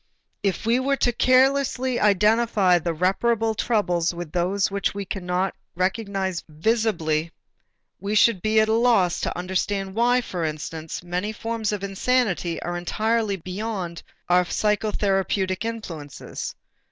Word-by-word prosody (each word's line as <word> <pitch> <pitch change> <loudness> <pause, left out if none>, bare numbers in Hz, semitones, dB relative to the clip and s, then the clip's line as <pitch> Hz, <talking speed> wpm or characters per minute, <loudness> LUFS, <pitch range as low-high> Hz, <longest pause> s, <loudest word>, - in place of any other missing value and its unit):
If 195 -1 -1
we 235 +2 +3
were 275 +1 +1
carelessly 255 +1 +2
to - - -2
identify 210 -2 +4
the 170 +1 -2
reparable 220 +7 +1
troubles 180 -7 0
with 170 -3 -6
those 185 +3 0
which 200 0 -1
we 200 -1 -4
cannot 185 0 -2 0.2
recognize 190 -1 -1
visibly, 165 -3 0 0.7
we 205 +2 -2
should 210 -3 +4
be 215 0 +3
at 215 - +4
a 220 - +2
loss 225 -7 +3
to - - -2
understand 190 +2 -2
why, 245 +3 +3
for 180 -7 -4
instance, 155 +1 -5
many 180 +4 -2
forms 225 0 -3
of 205 -2 -3
insanity 195 -4 0
are 175 0 -3
entirely 215 +4 0
beyond 185 -1 -5 0.3
our 180 +1 +4
psychotherapeutic 195 -1 0
influences. 170 -11 -6
200 Hz, 130 wpm, -24 LUFS, 180-225 Hz, 0.7 s, identify